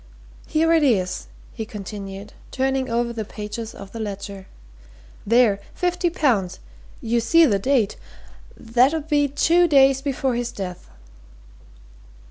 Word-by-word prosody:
Here 325 +1 +2
it 325 - +4
is," 200 -10 +1 0.3
he 225 - -5
continued, 200 -1 -8 0.2
turning 265 0 -1
over 235 0 -1
the 225 -2 -4
pages 215 +2 -7
of 200 -1 -10
the 230 - -7
ledger. 200 -2 -6 0.8
"There! 230 -3 +4 0.2
50 355 0 0
pounds. 235 - 0 0.4
You 235 +1 +1
see 330 +8 +5
the 205 -8 +2
date 235 -2 +1 0.6
that 245 +6 +2
'ud 315 -1 -4
be 290 -2 +2
two 335 +5 +3
days 270 -3 +5
before 270 -2 -1
his 240 0 -2
death." 180 -3 -7
235 Hz, 130 wpm, -22 LUFS, 205-280 Hz, 0.8 s, see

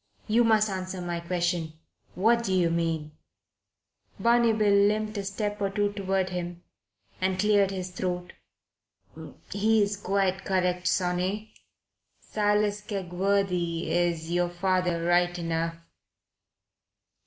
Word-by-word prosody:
"You 230 +2 +4
must 220 -2 +4
answer 185 -1 -4
my 175 -1 -3
question. 170 -2 -1 0.4
What 230 +6 +3
do 195 - -2
you 175 -3 +2
mean?" 165 -2 -1 1.1
Barney 235 0 +4
Bill 215 -2 +2
limped 215 +2 +2
a - - -3
step 205 +1 -3
or 200 - +1
two 205 +1 0
toward 190 -2 -1
him 175 -1 -5 0.6
and 185 0 +1
cleared 205 -1 +3
his 185 -2 -5
throat. 180 -1 -4 1.2
"He's 205 0 +2
quite 195 -1 0
correct, 180 -1 0
sonny. 185 +4 -1 0.7
Silas 210 0 0
Kegworthy's 175 -4 -1
your 175 0 +1
father 175 -1 0
right 175 0 +2
enough." 165 -1 -2
185 Hz, 110 wpm, -27 LUFS, 175-205 Hz, 1.2 s, You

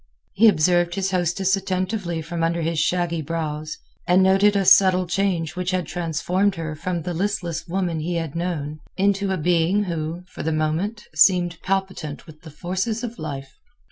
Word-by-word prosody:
He 225 +3 +5
observed 175 -1 +3
his 195 0 -1
hostess 185 +2 +1
attentively 185 -3 -2
from 165 +1 -4
under 165 0 0
his 165 0 -1
shaggy 170 0 0
brows, 155 -1 -4 0.3
and 180 +1 +5
noted 195 +2 +4
a 195 -1 +2
subtle 185 -1 +6
change 175 -3 -1
which 180 0 -2
had 185 -2 0
transformed 175 +4 0
her 160 -2 -4
from 170 +1 -3
the 175 +1 -3
listless 175 -2 -2
woman 175 -2 -1
he 170 +3 -2
had 165 -3 -3
known 155 -4 -3 0.2
into 200 0 +1
a 190 - 0
being 175 +4 +2
who, 165 -1 -4
for - - -9
the 160 - -1
moment, 160 +8 -1
seemed 175 +1 +3
palpitant 190 -6 -3
with 155 -2 -15
the 160 - -11
forces 190 +9 -3
of 235 -1 -6
life. 135 -4 -7
175 Hz, 175 wpm, -23 LUFS, 160-190 Hz, 0.3 s, subtle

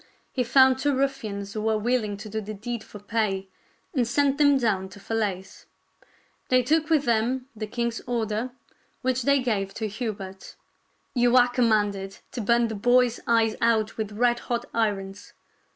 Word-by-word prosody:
He 255 - 0
found 260 +1 +5
two 285 0 +1
ruffians 215 -7 -2
who 215 - -3
were 220 0 +1
willing 215 -2 0
to 215 - -9
do 220 +1 -3
the 215 +1 -6
deed 230 +2 -5
for - - -11
pay, 205 -2 -2 0.4
and 250 -6 +1
sent 280 +3 +1
them 285 -1 +5
down 200 -6 0
to 190 - -13
Falaise. 200 -3 -3 0.8
They 255 0 +4
took 310 +4 +1
with 310 -3 +3
them 240 +1 +1
the 215 0 -5
king's 235 +1 -2
order, 230 0 -1 0.5
which 255 0 +1
they 280 +3 +3
gave 200 -5 -1
to 220 - -2
Hubert: 200 -3 -6 0.2
— - - -43
" - - -44
You 245 0 +4
are 245 0 +6
commanded 210 -5 +1
to 245 - -4
burn 235 +2 +3
the 225 - -5
boys 245 +3 +3
eyes 225 -1 +3
out 225 -2 +2
with 215 -2 -3
red 240 +2 +2
hot 240 0 -3
irons. 205 -3 -2
230 Hz, 175 wpm, -25 LUFS, 210-250 Hz, 0.8 s, are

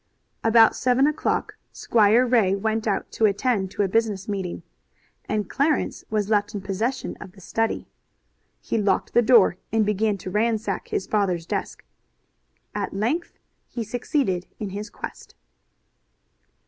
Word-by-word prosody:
About 225 0 +6
seven 255 +2 +3
o'clock 300 +1 -1
Squire 225 +2 +3
Ray 225 -6 +3
went 220 +2 -1
out 200 - -1
to 220 - +2
attend 200 -1 0
to 205 - -1
a - - +1
business 205 -1 0
meeting, 190 -4 -4 0.7
and 210 -2 -1
Clarence 295 +7 0
was 210 -2 0
left 210 -1 +1
in 200 - -3
possession 210 +7 -2
of 180 - -10
the 200 - -17
study. 225 +4 -2 0.7
He 230 - -1
locked 200 -2 0
the 240 - +5
door, 225 -7 +5
and 220 -1 +2
began 210 0 +1
to 185 - -7
ransack 215 -1 0
his - - -2
father's 185 -6 0
desk. - - -4 0.9
At - - -3
length 250 - -1 0.3
he 235 - -4
succeeded 220 - -1
in 205 -3 -4
his 205 +2 -5
quest. - - -9
215 Hz, 145 wpm, -24 LUFS, 195-230 Hz, 0.9 s, About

